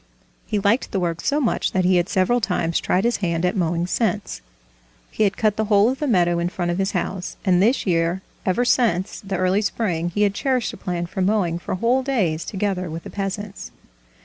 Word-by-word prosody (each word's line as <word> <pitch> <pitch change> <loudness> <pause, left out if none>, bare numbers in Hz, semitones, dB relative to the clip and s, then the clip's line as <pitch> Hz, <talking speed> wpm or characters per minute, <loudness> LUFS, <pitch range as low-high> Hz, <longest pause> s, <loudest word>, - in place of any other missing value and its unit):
He 215 - -1
liked 205 +5 +1
the 195 - 0
work 170 -2 -2
so 290 - +1
much 255 -7 0
that 185 -1 +1
he 185 0 +4
had 175 +2 0
several 215 +6 +2
times 170 -5 0
tried 185 - +1
his 235 +1 +1
hand 170 -2 -1
at 180 - 0
mowing 170 -2 0
since. 205 - -1 0.7
He 215 - +1
had 200 - 0
cut 215 -2 +1
the 220 - +1
whole 205 +1 +4
of 265 - -5
the 300 - -1
meadow 175 -7 +2
in 170 +1 0
front 175 -1 -2
of 175 - -2
his 195 +1 0
house, 185 0 -3
and 180 -2 +4
this 235 +7 +2
year 170 0 0 0.2
ever 195 +7 +1
since 225 -7 +1
the 195 -1 -4
early 185 +2 +2
spring 180 -6 -1
he 205 +4 0
had 200 -1 +2
cherished 255 +2 0
a - - -9
plan 175 -2 -3
for 185 +2 -5
mowing 185 -4 +1
for 175 - -4
whole 240 +7 +2
days 200 - 0
together 190 -3 -2
with 165 +1 -6
the - - -9
peasants. 200 0 -5
190 Hz, 220 wpm, -22 LUFS, 175-215 Hz, 0.7 s, he